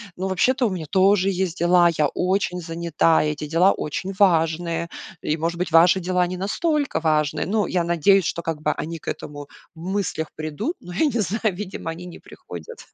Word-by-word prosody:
ну, 190 +1 -3
вообще-то, 250 +7 +2
у - - -1
меня 180 -5 -4
тоже 195 0 +4
есть 185 -2 -2
дела, 175 0 +5
я 150 - +3
очень 180 +1 -1
занята, 165 -1 +1
эти 150 0 -3
дела 180 +4 +5
очень 185 +6 -4
важные. 170 -2 +2 0.3
И, 155 +2 -1
может 165 +2 -2
быть, 180 -1 -2
ваши 175 +3 +6
дела 180 0 +1
не 180 +1 -5
настолько 285 - -1
важны. 155 -1 +1
Ну, 205 0 0
я 180 -2 0
надеюсь, 175 +3 +3
что 170 - -2
как 160 -2 -4
бы - - +1
они 165 +1 -5
к - - -20
этому 145 -1 -8 0.3
в 160 - -15
мыслях 190 -5 -2
придут. 155 - -4
Но 180 - -10
я 310 - +2
не 250 -5 0
знаю, 210 0 -1
видимо, 185 -4 -5
они 175 +2 -8
не 175 - -10
приходят. 475 - -11
175 Hz, 195 wpm, -23 LUFS, 165-195 Hz, 0.3 s, ваши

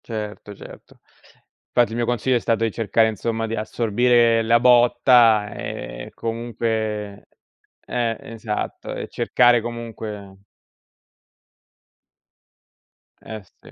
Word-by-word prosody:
Certo, 105 -2 -7
certo. - - -14 0.7
Infatti 120 -2 +1
il - - -5
mio 120 0 0
consiglio 120 +2 0
è - - -1
stato 115 0 0
di 115 - 0
cercare 110 +1 +1
insomma 115 +1 -3
di 115 0 -3
assorbire 115 +2 +2
la 115 +1 +3
botta, 120 -3 +4
ehm, 100 - -7
comunque 110 -3 -4 0.6
eh, 115 -2 -2
esatto 110 -2 -5
e - - -5
cercare 120 -1 +3
comunque 110 -4 -7 2.8
Eh 110 -2 -9 0.2
sì. - - -16
115 Hz, 105 wpm, -22 LUFS, 110-120 Hz, 2.8 s, botta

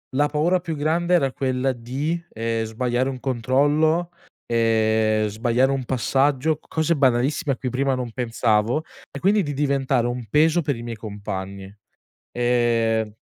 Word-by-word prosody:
La 145 +2 +3
paura 160 +5 +1
più 165 -2 -5
grande 165 +4 0
era 140 -7 +3
quella 130 0 -1
di, 130 +7 -3
ehm, 115 0 -1
sbagliare 120 +3 -1
un 130 -1 -5
controllo, 145 +7 +1 0.4
ehm, 110 -2 +2
sbagliare 120 +5 +1
un 135 -2 -2
passaggio, 135 +4 +1
cose 160 +1 0
banalissime, 135 +3 +2
a - - -7
cui 130 - -3
prima 135 +2 0
non 125 -2 -4
pensavo 115 +2 0 0.3
e 140 - -7
quindi, 205 +2 +3
di 145 -2 -3
diventare 135 -3 +1
un 120 0 -4
peso 160 - +3
per 145 -2 -1
i 115 - -8
miei 120 -1 -6
compagni. 100 -2 -6 0.6
Ehm 115 -3 +1
130 Hz, 150 wpm, -23 LUFS, 115-145 Hz, 0.6 s, La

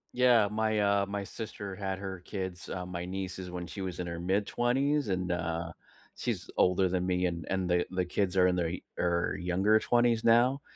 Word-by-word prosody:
Yeah, 120 -4 +5
my, 110 0 +1
uh, 100 -1 +3
my 100 0 -3
sister 100 -1 -6
had 95 -1 -3
her 95 -1 -5
kids, 95 -2 -5
uh, 90 -1 -4
my 90 -1 -5
nieces 95 0 -5
when 90 0 -5
she 90 - -8
was 95 -2 -4
in 90 - -3
her 85 0 -4
mid 95 +4 +1
20s, 135 +5 +1
and 90 -2 -1
uh, 85 -1 -2 0.4
she's - - -3
older 90 +1 +3
than 90 0 0
me. 90 0 +1
And 85 -2 -4
and 95 -1 0
the 90 0 +2
the 90 0 0
kids 90 +1 -1
are 90 -1 +5
in 90 - +2
their, 85 -1 0 0.3
er, 85 +1 +1
younger 95 +5 +3
20s 120 0 +2
now. 125 +4 +4
95 Hz, 200 wpm, -30 LUFS, 90-105 Hz, 0.4 s, Yeah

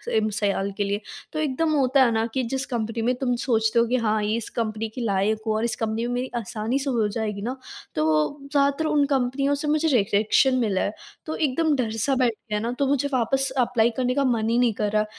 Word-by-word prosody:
M 215 0 +2
साल 200 -1 0
के 205 - +1
लिए। 200 +1 -2 0.3
तो 310 - -2
एकदम 310 +2 0
होता 270 -1 +4
है 240 - +3
ना 225 0 +1
कि 265 - 0
जिस 265 +3 -2
कंपनी 230 -3 -3
में 240 +3 +2
तुम 245 -1 -1
सोचते 230 -2 +1
हो 235 - +4
कि 250 - +1
हाँ, 215 -3 +1
इस 220 +1 -2
कंपनी 220 -1 -2
की 245 - -7
लायक 215 0 0
हो 220 - +2
और 220 - -1
इस 230 -2 -1
कंपनी 225 +1 -2
में 245 - -2
मेरी 250 +1 -2
आसानी 225 +3 -2
से 275 0 -2
हो 230 -5 +1
जाएगी 210 -1 -3
ना, 245 +5 -3 0.4
तो 155 - +1
वो 155 - +1
ज़्यादातर 280 +2 +2
उन 300 -2 +3
कंपनियों 275 +1 +1
से 295 +1 -4
मुझे 310 +2 +2
रिजेक्शन 220 +1 +3
मिला 205 -6 +1
है। 205 - -1 0.3
तो 315 - -4
एकदम 310 +1 +1
डर-सा 235 +1 0
बैठ 250 -3 +2 0.2
गया 210 - 0
ना, 230 +3 -2
तो 270 +3 -1
मुझे 285 0 +1
वापस 270 +2 +1
एप्लाई 240 -2 +3
करने 250 -1 +1
का 280 - +2
मन 230 -4 +1
ही 235 - +2
नहीं 245 -2 +3
कर 210 0 -1
रहा। 215 0 +2
235 Hz, 235 wpm, -24 LUFS, 220-270 Hz, 0.4 s, होता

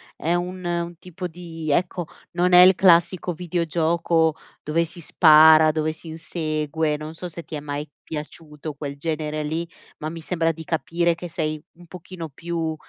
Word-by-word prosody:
è 165 - -1
un 180 +1 -3
un 170 0 -2
tipo 180 +1 -7
di 165 -2 -7
ecco, 175 +1 0 0.2
non 180 +1 +1
è 180 - +10
il 185 +1 +8
classico 180 0 +3
videogioco 165 -1 +1 0.3
dove 160 +3 +1
si 170 +1 -8
spara, 155 -1 +7
dove 155 0 -1
si 160 +1 -12
insegue 155 -1 -2
non 155 +1 -7
so 180 +2 -7
se 170 0 -9
ti - - -13
è 150 - -2
mai 145 +1 -5 0.2
piaciuto 150 0 -7
quel 140 -1 -6
genere 155 0 -3
lì, 160 +3 -3 0.3
ma 155 - -4
mi 165 +1 -8
sembra 165 0 0
di 160 0 -9
capire 170 +1 0
che 175 +1 -7
sei 155 -2 -3
un 175 +1 -17
pochino 175 -1 -9
più, 165 +2 -3
165 Hz, 170 wpm, -23 LUFS, 155-175 Hz, 0.3 s, è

